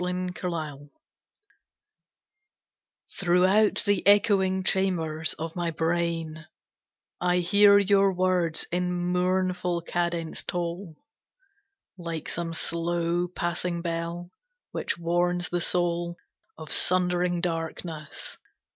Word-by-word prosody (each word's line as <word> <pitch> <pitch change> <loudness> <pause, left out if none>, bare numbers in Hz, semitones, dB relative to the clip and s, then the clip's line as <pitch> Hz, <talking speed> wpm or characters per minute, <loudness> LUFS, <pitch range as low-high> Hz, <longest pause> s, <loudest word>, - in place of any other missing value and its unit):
The 180 - -1
End 170 -5 -4 2.3
Throughout 190 +4 +3
the 205 -3 +2
echoing 195 -2 +4
chambers 165 -5 +1
of 160 +1 -6
my 175 -1 -1
brain 165 -1 -2 0.7
I 180 0 +2
hear 200 +3 +6
your 200 0 +4
words 180 -3 0
in 180 +1 0 0.2
mournful 180 -1 0
cadence 170 -1 -2
toll 175 0 -4 1.0
Like 165 -3 -5
some 165 -1 -3
slow 170 +1 0
passing 175 0 -3
bell 170 +1 -4 0.4
which - - -3
warns 175 +1 0
the 175 0 -1
soul 175 0 0 0.4
Of 155 -1 -9
sundering 180 -1 +2
darkness. 165 -2 -4
175 Hz, 95 wpm, -26 LUFS, 170-180 Hz, 2.3 s, hear